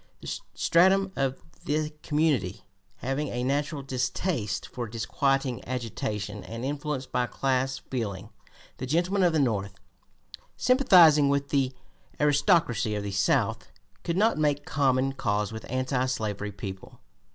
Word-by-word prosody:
This -, -, -5 dB
stratum 190 Hz, +3 st, +4 dB
of 135 Hz, -1 st, -1 dB, 0.2 s
the 150 Hz, +1 st, 0 dB
community, 145 Hz, -, 0 dB, 0.4 s
having 135 Hz, +3 st, -1 dB
a 125 Hz, -1 st, -3 dB
natural 145 Hz, +2 st, -1 dB
distaste 125 Hz, -, -2 dB
for 120 Hz, -1 st, -5 dB
disquieting 130 Hz, +3 st, -1 dB
agitation 110 Hz, -4 st, -4 dB
and 115 Hz, +5 st, -6 dB
influenced 145 Hz, -1 st, -3 dB
by 125 Hz, 0 st, +1 dB
class 130 Hz, 0 st, 0 dB
feeling, 105 Hz, -6 st, -5 dB, 0.5 s
the 130 Hz, -, -5 dB
gentlemen 175 Hz, +7 st, +1 dB
of 175 Hz, -2 st, +4 dB
the 160 Hz, -, +1 dB
North 100 Hz, -8 st, 0 dB, 0.8 s
sympathizing 175 Hz, -, +6 dB
with 140 Hz, 0 st, 0 dB
the 135 Hz, -2 st, +1 dB, 0.4 s
"aristocracy" 145 Hz, -, +3 dB
of 105 Hz, -, -3 dB
the 100 Hz, -, -4 dB
South, 95 Hz, 0 st, +1 dB, 0.3 s
could 170 Hz, 0 st, -1 dB
not 215 Hz, -4 st, +3 dB
make 145 Hz, -1 st, +1 dB
common 135 Hz, -2 st, +1 dB
cause 105 Hz, -5 st, -1 dB
with 110 Hz, 0 st, -8 dB
anti 130 Hz, 0 st, 0 dB
slavery 105 Hz, -5 st, -3 dB
people. 95 Hz, -1 st, -8 dB
135 Hz, 130 wpm, -27 LUFS, 115-150 Hz, 0.8 s, sympathizing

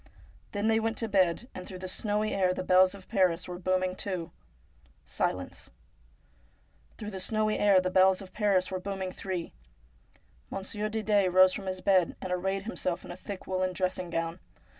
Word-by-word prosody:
Then 205 Hz, 0 st, -2 dB
they 220 Hz, 0 st, +4 dB
went 225 Hz, 0 st, -1 dB
to 225 Hz, -, -1 dB
bed, 190 Hz, +2 st, +2 dB
and 185 Hz, -, -8 dB
through 185 Hz, -, -7 dB
the 185 Hz, +1 st, -6 dB
snowy 210 Hz, +3 st, -1 dB
air 185 Hz, -2 st, +2 dB
the -, -, -3 dB
bells 185 Hz, +1 st, +5 dB
of 190 Hz, -2 st, -14 dB
Paris 185 Hz, -5 st, +2 dB
were 180 Hz, 0 st, -6 dB
booming 185 Hz, 0 st, 0 dB
two. 180 Hz, -4 st, -3 dB, 0.7 s
Silence! -, -, -3 dB, 1.3 s
Through 210 Hz, -1 st, -6 dB
the 190 Hz, -, -5 dB
snowy 215 Hz, +2 st, 0 dB
air 200 Hz, -2 st, +6 dB
the 185 Hz, 0 st, -1 dB
bells 190 Hz, 0 st, +5 dB
of 190 Hz, -2 st, -10 dB
Paris 195 Hz, -4 st, +2 dB
were 185 Hz, -, -2 dB
booming 190 Hz, -1 st, -4 dB
three. 185 Hz, -3 st, -5 dB, 1.0 s
Monsieur 210 Hz, +2 st, -3 dB
Didet 210 Hz, -3 st, +2 dB
rose 185 Hz, 0 st, +6 dB
from 195 Hz, -, -6 dB
his 185 Hz, 0 st, -3 dB
bed, 185 Hz, -3 st, +3 dB
and 185 Hz, -, -5 dB
arrayed 190 Hz, +2 st, -1 dB
himself 185 Hz, -5 st, -3 dB
in -, -, -8 dB
a -, -, -6 dB
thick 185 Hz, +1 st, -8 dB
woollen 185 Hz, 0 st, -1 dB
dressing 185 Hz, -1 st, -2 dB
gown. 165 Hz, +1 st, -2 dB
185 Hz, 180 wpm, -29 LUFS, 185-205 Hz, 1.3 s, air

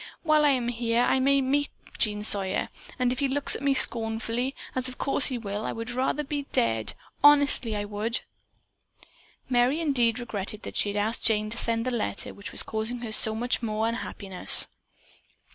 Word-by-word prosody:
While 310 Hz, -2 st, +3 dB
I -, -, +5 dB
am 250 Hz, -3 st, 0 dB
here, 235 Hz, 0 st, 0 dB
I 265 Hz, -, +2 dB
may 275 Hz, +1 st, +2 dB
meet 285 Hz, +2 st, 0 dB, 0.3 s
Jean 210 Hz, -1 st, +1 dB
Sawyer, 195 Hz, -3 st, +2 dB, 0.3 s
and 250 Hz, -1 st, +1 dB
if 250 Hz, -, -3 dB
he 280 Hz, -, +1 dB
looks 275 Hz, +1 st, 0 dB
at -, -, -6 dB
me 280 Hz, -1 st, +1 dB
scornfully, 230 Hz, +2 st, +2 dB, 0.2 s
as 255 Hz, 0 st, 0 dB
of 255 Hz, -, -10 dB
course 275 Hz, -1 st, +3 dB
he 255 Hz, -, -2 dB
will, 205 Hz, -2 st, -5 dB
I -, -, -3 dB
would 230 Hz, +1 st, -6 dB
rather 260 Hz, +4 st, -1 dB
be 285 Hz, 0 st, -5 dB
dead, 115 Hz, -1 st, 0 dB, 0.3 s
honestly 285 Hz, -6 st, +5 dB
I 205 Hz, 0 st, -3 dB
would!" 210 Hz, +3 st, -3 dB, 1.3 s
Merry 250 Hz, +4 st, +1 dB
indeed 250 Hz, -7 st, +1 dB
regretted 215 Hz, -3 st, -6 dB
that -, -, -8 dB
she 205 Hz, -, +2 dB
had 205 Hz, -, -4 dB
asked 220 Hz, +3 st, 0 dB
Jane 215 Hz, -1 st, +1 dB
to 230 Hz, -, -1 dB
send 230 Hz, 0 st, -1 dB
the 255 Hz, -, -1 dB
letter 230 Hz, -4 st, -3 dB
which 200 Hz, -, -10 dB
was -, -, -2 dB
causing 220 Hz, +2 st, -4 dB
her 230 Hz, -2 st, -6 dB
so 220 Hz, 0 st, +5 dB
much 240 Hz, +2 st, -2 dB
unhappiness. 215 Hz, -4 st, +1 dB
235 Hz, 185 wpm, -26 LUFS, 215-265 Hz, 1.3 s, I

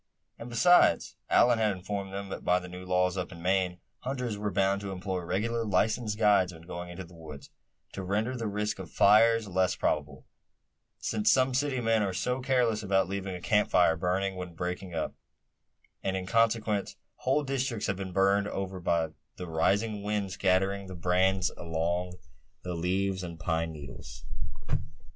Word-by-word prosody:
And 115 Hz, -, -7 dB
besides, 175 Hz, +10 st, +4 dB
Allan 120 Hz, -1 st, +5 dB
had 110 Hz, -2 st, +2 dB
informed 95 Hz, +1 st, -4 dB
them 100 Hz, 0 st, -5 dB
that -, -, -6 dB
by 90 Hz, -, +3 dB
the 90 Hz, 0 st, -5 dB
new 90 Hz, +1 st, -9 dB
laws 90 Hz, 0 st, +2 dB
up 90 Hz, -, -3 dB
in 85 Hz, -, -10 dB
Maine, 90 Hz, 0 st, 0 dB, 0.2 s
hunters 125 Hz, -3 st, -3 dB
were 105 Hz, 0 st, -2 dB
bound 100 Hz, 0 st, +1 dB
to 100 Hz, -1 st, -5 dB
employ 95 Hz, 0 st, -3 dB
regular 110 Hz, +7 st, -1 dB
licensed 105 Hz, +2 st, +1 dB
guides 100 Hz, -4 st, +4 dB
when 80 Hz, -1 st, -13 dB
going 85 Hz, 0 st, -7 dB
into 85 Hz, +2 st, -7 dB
the 90 Hz, 0 st, -15 dB
woods, 80 Hz, -4 st, -11 dB, 0.4 s
to 100 Hz, -, -5 dB
render 105 Hz, +7 st, -1 dB
the 115 Hz, -3 st, -3 dB
risk 105 Hz, 0 st, -2 dB
of 90 Hz, -3 st, -7 dB
fires 110 Hz, +5 st, +5 dB
less 95 Hz, -1 st, +1 dB
probable; 75 Hz, -3 st, -2 dB, 0.7 s
since 110 Hz, -1 st, +1 dB
some 130 Hz, 0 st, +3 dB
city 135 Hz, 0 st, 0 dB
men 115 Hz, -1 st, +2 dB
are 95 Hz, -3 st, -1 dB
so 125 Hz, +7 st, -1 dB
careless 125 Hz, -4 st, +2 dB
about 95 Hz, -2 st, +2 dB
leaving 95 Hz, -1 st, -3 dB
a -, -, -6 dB
camp 105 Hz, +4 st, +2 dB
fire 85 Hz, -2 st, +4 dB
burning 95 Hz, +3 st, -1 dB
when 90 Hz, -2 st, -7 dB
breaking 90 Hz, +1 st, -4 dB
up; 80 Hz, -, -2 dB, 0.9 s
and 95 Hz, 0 st, -1 dB
in 95 Hz, -, -4 dB
consequence 110 Hz, -1 st, +1 dB, 0.2 s
whole 135 Hz, +3 st, +1 dB
districts 135 Hz, -5 st, -1 dB
have 100 Hz, -, -1 dB
been 95 Hz, -1 st, -5 dB
burned 100 Hz, +2 st, +3 dB
over 95 Hz, -2 st, -4 dB
by 85 Hz, -2 st, +1 dB, 0.3 s
the 90 Hz, -, -6 dB
rising 100 Hz, +6 st, +1 dB
wind 100 Hz, -1 st, -2 dB
scattering 95 Hz, +1 st, +1 dB
the 95 Hz, -, -7 dB
brands 90 Hz, +2 st, +2 dB
among 85 Hz, +2 st, -2 dB, 0.5 s
the 90 Hz, -, -4 dB
leaves 95 Hz, +3 st, 0 dB
and 85 Hz, -2 st, -7 dB
pine 80 Hz, -1 st, -1 dB
needles. 65 Hz, -5 st, -10 dB
95 Hz, 175 wpm, -29 LUFS, 90-105 Hz, 0.9 s, Allan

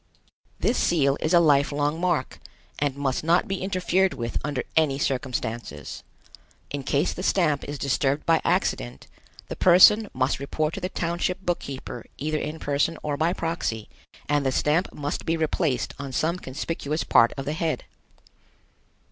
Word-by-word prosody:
This -, -, +1 dB
seal 140 Hz, -5 st, +2 dB
is 155 Hz, -, -1 dB
a 175 Hz, -, +7 dB
life 145 Hz, -4 st, +4 dB
long 145 Hz, +2 st, -1 dB
mark, 175 Hz, -8 st, -1 dB, 0.4 s
and 145 Hz, -2 st, 0 dB
must 140 Hz, -1 st, -1 dB
not 170 Hz, +3 st, +3 dB
be 195 Hz, -1 st, -3 dB
interfered 185 Hz, -1 st, +1 dB
with 120 Hz, -3 st, -3 dB
under 145 Hz, -3 st, -2 dB
any 155 Hz, -4 st, +3 dB
circumstances. 125 Hz, -4 st, -3 dB, 0.7 s
In 145 Hz, -, -3 dB
case 145 Hz, +4 st, 0 dB
the -, -, -6 dB
stamp 170 Hz, -7 st, +1 dB
is 145 Hz, 0 st, -5 dB
disturbed 140 Hz, +1 st, 0 dB
by 165 Hz, -1 st, +3 dB
accident, -, -, -1 dB, 0.4 s
the -, -, -5 dB
person 190 Hz, +4 st, +6 dB
must 130 Hz, +1 st, 0 dB
report 155 Hz, +3 st, -2 dB
to 195 Hz, -, -5 dB
the 180 Hz, -, -2 dB
township 180 Hz, +2 st, -2 dB
book 175 Hz, -1 st, 0 dB
keeper 130 Hz, -3 st, -7 dB
either 155 Hz, +1 st, -1 dB
in 155 Hz, +1 st, -4 dB
person 145 Hz, +2 st, 0 dB
or 150 Hz, -1 st, -1 dB
by 160 Hz, +4 st, +1 dB
proxy, 165 Hz, -, -3 dB, 0.4 s
and 145 Hz, -1 st, +1 dB
the 135 Hz, -, +1 dB
stamp 150 Hz, +7 st, +1 dB
must 145 Hz, 0 st, -4 dB
be 165 Hz, 0 st, 0 dB
replaced 155 Hz, -, 0 dB
on 140 Hz, -1 st, -5 dB
some 165 Hz, +6 st, 0 dB
conspicuous 150 Hz, +2 st, -3 dB
part 115 Hz, +1 st, +5 dB
of 135 Hz, -, -4 dB
the 150 Hz, -, -2 dB
head. 160 Hz, 0 st, -2 dB
150 Hz, 165 wpm, -25 LUFS, 140-170 Hz, 0.7 s, a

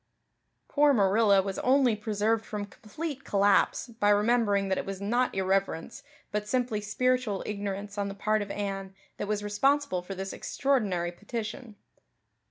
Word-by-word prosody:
Poor 290 Hz, -1 st, +4 dB
Marilla 200 Hz, -2 st, +4 dB
was 195 Hz, 0 st, -4 dB
only 255 Hz, -3 st, +3 dB
preserved 215 Hz, +1 st, 0 dB
from 210 Hz, -2 st, -5 dB
complete 270 Hz, -, -7 dB
collapse 200 Hz, -2 st, +3 dB
by 220 Hz, -3 st, 0 dB
remembering 205 Hz, -1 st, +3 dB
that 190 Hz, -, 0 dB
it -, -, -4 dB
was 195 Hz, -1 st, -4 dB
not 240 Hz, +5 st, 0 dB
irreverence, 190 Hz, -3 st, -1 dB, 0.3 s
but 210 Hz, 0 st, -2 dB
simply 245 Hz, -3 st, 0 dB
spiritual 245 Hz, 0 st, 0 dB
ignorance 200 Hz, 0 st, -4 dB
on 200 Hz, -, 0 dB
the 195 Hz, -, -6 dB
part 215 Hz, +1 st, +1 dB
of 205 Hz, -, -5 dB
Anne 195 Hz, -1 st, -4 dB, 0.2 s
that 205 Hz, -, -4 dB
was 210 Hz, 0 st, -1 dB
responsible 270 Hz, 0 st, +1 dB
for 190 Hz, +2 st, -7 dB
this 195 Hz, +1 st, -5 dB
extraordinary 205 Hz, -11 st, 0 dB
petition. 215 Hz, +4 st, -6 dB
205 Hz, 150 wpm, -28 LUFS, 195-235 Hz, 0.3 s, Poor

